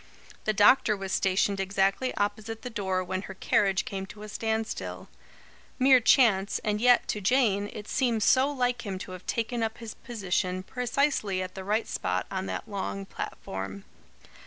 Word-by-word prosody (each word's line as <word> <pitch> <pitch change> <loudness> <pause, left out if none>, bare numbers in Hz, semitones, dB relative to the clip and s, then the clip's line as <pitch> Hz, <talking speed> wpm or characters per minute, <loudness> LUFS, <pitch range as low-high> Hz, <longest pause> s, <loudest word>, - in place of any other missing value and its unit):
The 215 - +2
doctor 210 +1 +5
was 195 -1 -5
stationed 195 +1 +1
exactly 195 +6 +1
opposite 215 +2 -3
the 250 - -5
door 190 -3 -1
when 185 +1 -3
her 195 0 -9
carriage 195 0 +2
came 195 -1 -5
to 210 +2 -11
a 215 - -8
standstill; 220 +1 -3 0.7
mere 260 0 +6
chance, 220 -6 +4
and 210 0 -1
yet, 245 0 +5
to 210 - -1
Jane, 205 -2 +2
it 210 -1 -8
seemed 240 -5 +1
so 265 +5 +4
like 250 -4 -1
him 195 -3 -4
to 185 - -8
have 185 0 -10
taken 230 +1 -1
up 225 0 -2
his 230 -2 -7
position 185 -5 -2
precisely 245 -5 0
at 185 - -7
the 190 - -7
right 215 +4 0
spot - - -2
on 190 0 -3
that - - -4
long 100 - -4
platform. 95 +1 -6
210 Hz, 170 wpm, -28 LUFS, 190-230 Hz, 0.7 s, mere